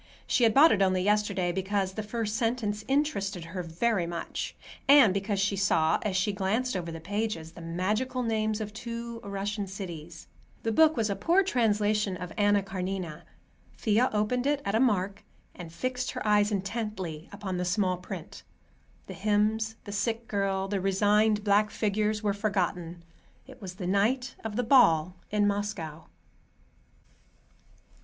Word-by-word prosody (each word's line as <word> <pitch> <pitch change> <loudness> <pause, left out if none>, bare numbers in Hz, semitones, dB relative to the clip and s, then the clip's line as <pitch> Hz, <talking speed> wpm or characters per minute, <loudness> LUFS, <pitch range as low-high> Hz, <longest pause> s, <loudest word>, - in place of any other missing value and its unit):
She 245 - +3
had 225 - +4
bought 310 +4 +8
it, 200 - +2
only 185 -1 +2
yesterday, 200 -3 +1
because 190 +1 -1
the 215 - -3
first 215 0 -3
sentence 225 -3 -1
interested 210 - 0
her 180 +2 -5
very 175 +3 0
much, 170 0 -4 0.3
and 275 -8 +7
because 200 +1 -1
she 200 +1 +1
saw, 165 -5 +2
as 195 -3 -1
she 195 +2 +1
glanced 210 +6 -1
over 170 -2 -3
the 165 - -6
pages, 195 -2 -3
the 170 - -12
magical 210 +10 -1
names 220 -1 0
of 210 -1 -5
two 235 +1 -6
Russian 200 0 -4
cities. 170 -4 -8 0.4
The 225 - 0
book 315 +5 +4
was 220 -3 +1
a - - -1
poor 340 - +3
translation 210 - +1
of 180 -1 -7
"Anna 205 -1 +3
Karenina." 185 -4 -4 0.5
Thea 225 +4 +2
opened 230 +5 0
it 285 -1 0
at 200 - -1
a 220 - +3
mark, 200 -5 +1 0.3
and 170 -2 -9
fixed 250 +8 -3
her 255 - -5
eyes 210 0 +4
intently 195 -5 -4
upon 200 -2 -4
the 180 - -1
small 185 0 +1
print. 180 - -8 0.6
The - - -8
hymns, 215 +2 +1
the 205 - -8
sick 225 +3 -2
girl, 195 -1 -1
the 195 -1 -2
resigned 210 +2 +3
black 205 +1 +3
figures 215 0 -1
were 205 -1 +1
forgotten. 180 -4 -2 0.4
It - - -14
was 185 -2 -7
the 185 - -6
night 230 +7 +1
of 220 -2 -4
the 245 - 0
ball 180 - +4
in 210 0 +2
Moscow. 200 -6 -3
205 Hz, 160 wpm, -28 LUFS, 185-220 Hz, 0.6 s, bought